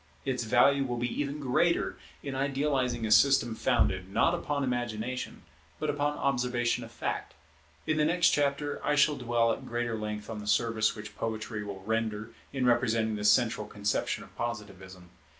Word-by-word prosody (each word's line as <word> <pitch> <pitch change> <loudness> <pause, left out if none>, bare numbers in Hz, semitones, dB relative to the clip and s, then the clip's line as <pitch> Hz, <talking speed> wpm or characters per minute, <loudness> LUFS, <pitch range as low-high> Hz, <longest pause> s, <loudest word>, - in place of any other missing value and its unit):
Its 125 -3 -1
value 135 +4 +4
will 125 -2 -3
be 120 +3 -2
even 145 +1 -3
greater 150 +6 +1 0.3
in 140 - -4
idealizing 135 -3 0
a 110 - -2
system 120 +1 +5
founded, 105 -6 +1
not 165 - +3
upon 145 -4 -1
imagination, 120 -1 -3 0.3
but - - -1
upon 145 0 -1
observation 125 -3 0
of - - -10
fact. - - -4 0.5
In 155 0 0
the 150 - +3
next 170 +2 +4
chapter 145 0 0
I 150 - +2
shall 150 0 +4
dwell 120 -3 +1
at - - -7
greater 120 -1 -2
length 105 -1 -4
on 110 -2 -5
the 105 - -8
service 110 0 +2
which 105 0 -9
Poetry 110 -1 -4
will 100 -2 -7
render 110 0 -2 0.2
in 130 -2 -1
representing 115 -3 +2
the 105 - -4
central 105 0 +3
conception 100 0 -1
of - - -17
Positivism. 95 -6 -6
120 Hz, 170 wpm, -29 LUFS, 110-140 Hz, 0.5 s, system